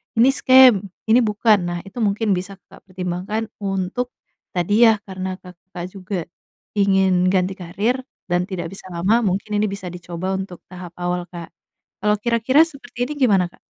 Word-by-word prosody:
ini 235 +4 +5
scam, 255 -7 +6 0.2
ini 230 +3 +6
bukan. 210 0 +3
Nah 175 0 -3
itu 195 - -13
mungkin 205 +1 0
bisa 185 +2 -5
Kakak - - -19
pertimbangkan 185 +4 -3
untuk, 195 +5 -2 0.4
tadi 205 +7 +4
yah 220 - +5
karena 185 -1 -5
Kakak 180 0 -10
juga 190 -1 -4 0.6
ingin 190 -2 +3
ganti 185 0 +1
karir 200 +7 -1 0.3
dan 175 0 +1
tidak 175 -4 -4
bisa 195 - -11
lama. 195 +7 +2
Mungkin 200 +2 -1
ini 210 - +2
bisa 195 -2 -6
dicoba 175 +1 -5
untuk 190 -2 -7
tahap 180 -1 -9
awal, 175 0 -1
Kak. 170 -2 -8 0.5
Kalau 210 +1 +2
kira-kira 235 +6 +3
seperti 270 -5 -6
ini - - -2
gimana 200 -9 +4
Kak? - - -22
195 Hz, 160 wpm, -21 LUFS, 180-220 Hz, 0.6 s, scam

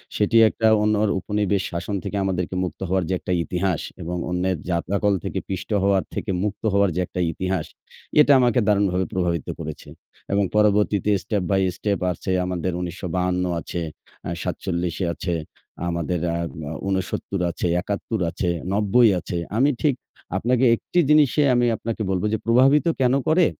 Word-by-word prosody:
সেটি 105 +2 +2
একটা 110 - 0 0.2
অন্যর 105 0 +2
উপনিবেশ 105 0 0
শাসন 85 +4 -3
থেকে 100 - -3
আমাদেরকে 90 -1 -2
মুক্ত 90 -3 -5
হওয়ার 95 0 +1
যে - - +1
একটা - - -5
ইতিহাস 90 -1 -1 0.2
এবং 90 +2 -3
অন্যের 90 0 0
যাতাকল 100 +4 +1
থেকে - - -2
পিষ্ট 95 - -4
হওয়ার 100 -1 +3
থেকে 105 - -3
মুক্ত 105 -1 -3
হওয়ার 100 0 +4
যে 90 - +1
একটা - - -6
ইতিহাস 95 -1 -2 0.6
এটা 145 - +5
আমাকে 125 0 +3
দারুণভাবে 100 -3 +2
প্রভাবিত 85 -5 -1
করেছে - - -7 0.4
এবং 100 0 +3
পরবর্তীতে 105 -1 +3
step 100 -1 -1
by 95 - +3 0.2
step 100 0 -1
আছে 90 +2 -4
আমাদের 90 0 -2
১৯৫২ 90 +1 -2 0.2
আছে, 85 +1 -5 0.5
আ - - -2
৪৭ 85 -2 -2 0.2
আছে, 85 +1 -3 0.5
আমাদের 85 +1 -1 0.2
আ - - -1 0.3
আ - - -4
৬৯ 95 0 -2
আছে, 85 - -2
৭১ 105 +3 -3
আছে, 90 +1 -2 0.2
৯০ 105 +3 +4
আছে। 85 +1 -5 0.2
আমি 135 +4 +4
ঠিক 145 -4 +2 0.4
আপনাকে 125 +2 +2
একটি 175 - -1
জিনিসে 150 -1 +5
আমি 120 0 +3
আপনাকে 115 0 -4
বলব 95 -1 0
যে, - - +2
প্রভাবিত 130 +7 +4 0.2
কেন 125 0 +3
করে? 165 +3 +4
95 Hz, 160 wpm, -23 LUFS, 90-105 Hz, 0.6 s, এটা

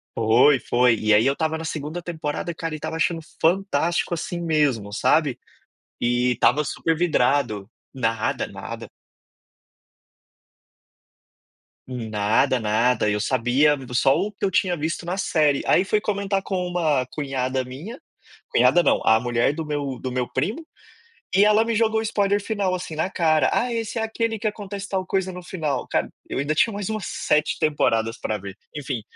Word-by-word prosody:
Foi, 120 +5 +4
foi, 120 -1 +3
e 110 0 +3
aí 105 +2 +5
eu 135 - +4
estava 160 +2 -1
na 160 - -6
2º 155 +2 -4
temporada 165 0 -4
cara 165 -1 -5
e - - -5
estava 160 +1 -5
achando 165 0 0 0.2
fantástico, 175 -1 +1
assim, 170 +1 -4
mesmo 145 -11 +1
sabe. 140 +5 +2 0.6
E 120 +1 +2
estava 125 +6 +2
super 160 +3 -1
vidrado 125 - +1 0.2
nada, 115 -4 -1
nada. - - -8 3.0
Nada, 115 +2 +1
nada, 110 +1 +2
eu 105 - 0
sabia 130 +6 +2 0.2
só 135 +2 +3
o 210 - -1
que 200 - -3
eu 190 - 0
tinha 180 -2 +1
visto 160 +4 -3
na 180 +3 -3
série, 150 -6 +2
aí 185 - +4
fui 210 +2 +1
comentar 200 -2 -1
com 190 - -3
uma 155 -7 +1
cunhada 130 -3 -2
minha, 160 - -8 0.5
cunhada 175 - +4
não, - - +2
a 110 0 +5
mulher 120 +2 +1
do 160 -1 -4
meu 145 -3 -3
do 130 - -4
meu 125 -1 -2
primo, 205 - -2 0.7
e 195 - +5
ela 210 +1 +4
me 230 0 -1
jogou 220 0 +2
o - - -3
spoiler 205 -2 +1
final 200 -3 -1
assim 180 -3 -5
na 160 +4 -1
cara, 155 -3 +2
"Ah, 245 0 +1
esse 230 0 -3
é - - -1
aquele 225 0 -2
que 220 - -4
acontece 200 -1 -4
tal 190 -1 -2
coisa 190 0 -1
no 180 - -8
final". 155 -7 -3
Cara, - - 0 0.2
eu - - -3
ainda 145 +3 0
tinha 225 +8 +3
mais 205 0 -4
umas 215 -3 -3
7 150 +1 0
temporadas 115 -7 +1
para 110 - -2
ver. 100 0 -8 0.2
Enfim, 135 -5 -4
155 Hz, 170 wpm, -23 LUFS, 125-190 Hz, 3.0 s, aí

